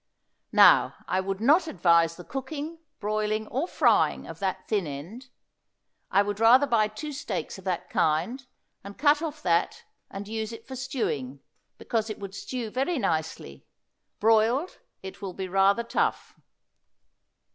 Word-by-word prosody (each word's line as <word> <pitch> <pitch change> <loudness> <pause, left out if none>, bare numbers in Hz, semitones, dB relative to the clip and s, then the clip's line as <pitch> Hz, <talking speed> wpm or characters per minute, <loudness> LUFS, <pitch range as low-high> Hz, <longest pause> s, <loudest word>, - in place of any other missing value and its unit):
Now - - +6
I 185 - +1
would 195 0 -3
not 300 +10 +4
advise 170 - +3
the 180 - -10
cooking, 290 - -6 0.2
broiling 215 +1 -1
or 275 +8 -1
frying - - +2
of - - -9
that - - -3
thin 205 -6 0
end. 170 - -8 0.8
I 200 - +4
would 205 0 -4
rather 245 +5 +6
buy 225 -5 +2
two 250 +9 -7
steaks 275 -7 -4
of 190 - -15
that 185 -2 -2
kind 170 - 0 0.4
and 200 +1 -10
cut 295 +2 +4
off 310 -2 -5
that 170 -1 +1 0.3
and 200 +1 -7
use 220 0 -4
it 230 - -10
for 260 - -7
stewing, 145 - -3 0.4
because 225 -1 -2
it 215 - -5
would 195 -1 -8
stew 235 +1 -5
very 275 +8 -1
nicely; 160 - -3 0.5
broiled 225 - +2 0.2
it 190 +1 -9
will 195 -2 -5
be 190 0 -5
rather 195 +4 +3
tough. 235 - -1
215 Hz, 150 wpm, -27 LUFS, 190-260 Hz, 0.8 s, Now